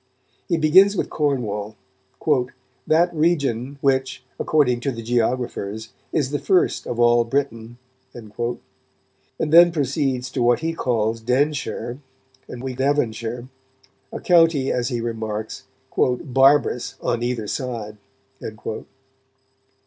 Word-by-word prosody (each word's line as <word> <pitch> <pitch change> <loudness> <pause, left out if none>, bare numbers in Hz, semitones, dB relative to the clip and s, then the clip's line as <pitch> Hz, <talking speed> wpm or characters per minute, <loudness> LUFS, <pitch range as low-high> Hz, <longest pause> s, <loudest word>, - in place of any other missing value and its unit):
He 170 - +1
begins 185 +6 +5
with - - -2
Cornwall, 110 -8 -2 1.1
"that 170 +3 +3
region 140 -5 0
which, 130 -1 0 0.2
according 130 -6 +2
to 135 +3 -2
the 115 -2 -7
geographers, 115 -2 -2 0.2
is 145 -4 0
the 145 - -1
first 185 -2 +1
of 120 - -4
all 120 0 +5
Britain," 115 -2 -3 0.3
and 110 -3 -12 1.1
then 170 +3 +6
proceeds 135 -4 -1
to 130 - -2
what 120 +2 +3
he 165 0 -1
calls 115 -6 -1
"Denshire" 130 0 -1 0.5
and 125 0 -8
we 130 -1 -3
Devonshire, 120 -3 -1 0.6
a - - -5
county, 165 -6 +3
as 125 0 -1
he 120 -3 -2
remarks, 110 -2 -4 0.3
"barbarous 135 +1 +2
on 120 - -1
either 120 -2 -2
side." 115 -3 -4
125 Hz, 110 wpm, -22 LUFS, 115-145 Hz, 1.1 s, then